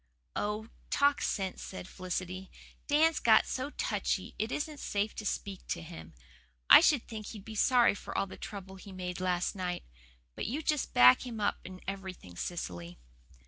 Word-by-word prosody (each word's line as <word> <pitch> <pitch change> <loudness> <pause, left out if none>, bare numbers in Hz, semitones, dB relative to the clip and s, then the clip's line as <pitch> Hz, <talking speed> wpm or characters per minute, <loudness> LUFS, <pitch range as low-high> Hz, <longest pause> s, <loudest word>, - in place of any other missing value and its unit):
"Oh, 210 +2 -2 0.2
talk 285 0 +3
sense," 190 -3 -2
said 185 -1 -7
Felicity. 185 0 -4 0.4
"Dan's 310 +2 +4
got 225 - +6
so 260 +2 -3
touchy - - -2
it 220 +3 -1
isn't 300 -1 -3
safe 205 -2 -1
to 210 - -4
speak 195 -2 -4
to 85 - -3
him. 80 -2 -10 0.6
I - - +12
should 285 -6 +3
think 215 -3 -7
he'd 210 -4 -9
be 220 - -7
sorry 240 +2 +5
for - - -6
all - - +2
the 190 - -10
trouble 195 -2 -8
he 195 +1 -11
made 180 -1 -5
last 180 -1 0
night. 180 -2 -3 0.5
But - - -4
you 285 +8 -2
just 300 -2 0
back 125 +1 +8
him 235 -4 -6
up 205 - 0
in 185 0 -9
everything, 190 - -6
Cecily." 90 - -5
195 Hz, 175 wpm, -31 LUFS, 180-230 Hz, 0.6 s, I